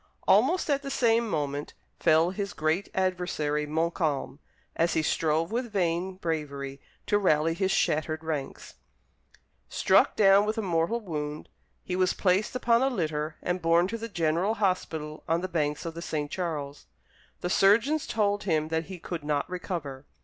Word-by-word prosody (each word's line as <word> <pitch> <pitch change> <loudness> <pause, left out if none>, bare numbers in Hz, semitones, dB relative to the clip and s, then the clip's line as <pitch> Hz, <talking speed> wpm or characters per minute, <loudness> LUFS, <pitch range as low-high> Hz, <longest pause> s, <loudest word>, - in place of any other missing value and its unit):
Almost 365 - +4
at 280 -2 +1
the 275 - -6
same 235 -4 +2
moment 145 -4 -3 0.2
fell 165 +1 +4
his 200 +1 -4
great 155 +5 -1
adversary, 180 -5 -1
Montcalm, 155 -3 -1 0.4
as 165 +1 +1
he 160 - +2
strove 160 +2 0
with 240 0 -2
vain 180 -1 0
bravery 145 -6 -4 0.2
to 205 - +2
rally 160 -4 +2
his 190 +2 0
shattered 155 -2 0
ranks. 150 -4 -5 1.0
Struck - - +3
down 200 0 +5
with 215 +2 -1
a 220 - -1
mortal 170 +5 0
wound, 150 -7 -5 0.3
he 180 - -3
was 185 0 +2
placed 195 +5 +1
upon 235 -1 +3
a 265 - +3
litter 155 - -2
and 180 0 -1
borne 170 +2 +3
to 230 - -3
the 230 +1 -5
General 170 +3 0
Hospital 160 -6 -2
on 165 +1 +2
the 185 - -2
banks 150 -4 -1
of 165 - -4
the 170 - -7
St. 150 -3 -3
Charles. 150 -6 -4 0.5
The 175 - -2
surgeons 230 +12 +3
told 205 -2 +1
him 155 -4 +1
that 160 0 -1
he 185 +1 -8
could 170 -2 -6
not 145 -1 -1
recover. 165 -7 -5
170 Hz, 165 wpm, -28 LUFS, 155-195 Hz, 1.0 s, down